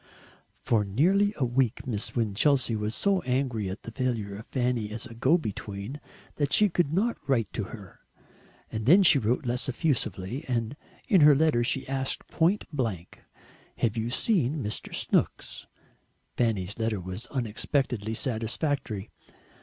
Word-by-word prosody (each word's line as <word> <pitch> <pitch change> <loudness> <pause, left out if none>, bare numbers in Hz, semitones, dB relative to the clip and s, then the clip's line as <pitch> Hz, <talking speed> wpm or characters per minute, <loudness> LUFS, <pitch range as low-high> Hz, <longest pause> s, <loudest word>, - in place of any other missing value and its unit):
For 110 -3 +2
nearly 180 - +3
a 135 - +1
week 120 -1 0
Miss 110 -5 -3
Winchelsea 120 +3 +2
was 105 +1 -2
so 195 -2 +1
angry 125 -6 -1
at 95 - -7
the 115 - -7
failure 115 -5 -2
of 110 +3 -10
Fanny 125 -4 -1
as 110 +2 -6
a 125 - -10
go 120 +9 +3
between 105 - -6 0.4
that 145 -1 0
she 210 -1 +5
could 170 -4 +1
not 215 +8 0
write 115 -5 +1
to 105 - -2
her. 100 -3 -11 0.7
And 110 +1 -4
then 185 +7 +7
she 160 -5 +6
wrote 125 +5 0
less 125 +2 -1
effusively, 130 - -1
and 120 0 -1 0.3
in 195 -7 +5
her 150 -1 +8
letter 145 -5 +3
she 130 +3 -1
asked 135 0 -2
point 180 +5 +2
blank, 110 - -3 0.6
"Have 115 -1 0
you 115 +1 -1
seen 150 - +1
Mr. 105 0 -5
Snooks?" - - -1 0.7
Fanny's 105 -4 0
letter 110 -2 0
was 95 +6 -6
unexpectedly 120 -2 -1
satisfactory. 115 -2 -2
120 Hz, 150 wpm, -28 LUFS, 110-145 Hz, 0.7 s, her